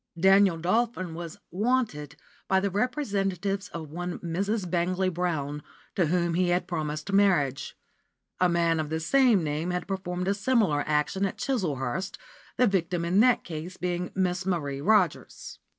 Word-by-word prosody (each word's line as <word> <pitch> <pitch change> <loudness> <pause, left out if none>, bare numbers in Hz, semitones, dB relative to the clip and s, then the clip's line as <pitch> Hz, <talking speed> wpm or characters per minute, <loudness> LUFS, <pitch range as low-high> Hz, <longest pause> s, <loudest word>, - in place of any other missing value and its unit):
Daniel 195 -1 +5
Dolphin 185 0 0
was 170 -1 -7
"wanted" 200 - -1 0.3
by 190 - +3
the 195 0 -1
representatives 200 - -1
of 160 -3 -8
one 175 +2 -4
Mrs. 195 +4 -2
Bangley 185 +2 0
Brown, 155 -4 -2 0.3
to 175 -4 +1
whom 170 +1 +1
he 180 +1 +1
had 175 +1 +1
promised 155 +1 -3
marriage; 175 -10 +2 0.6
a 180 - +4
man 170 -1 +2
of 155 -1 -2
the 160 +1 -1
same 235 +2 +3
name 155 +3 -2
had 180 0 -3
performed 180 -2 -3
a 200 - +3
similar 200 - +1
action 150 +6 0
at - - -7
Chislehurst, 185 - -2 0.4
the 250 - +5
victim 180 -4 0
in 180 +4 +2
that 250 +2 +4
case 170 +2 -7
being 180 0 -2
Miss 185 -1 0
Marie 145 -7 -2
Rogers. 190 -2 0
180 Hz, 150 wpm, -27 LUFS, 165-195 Hz, 0.6 s, Daniel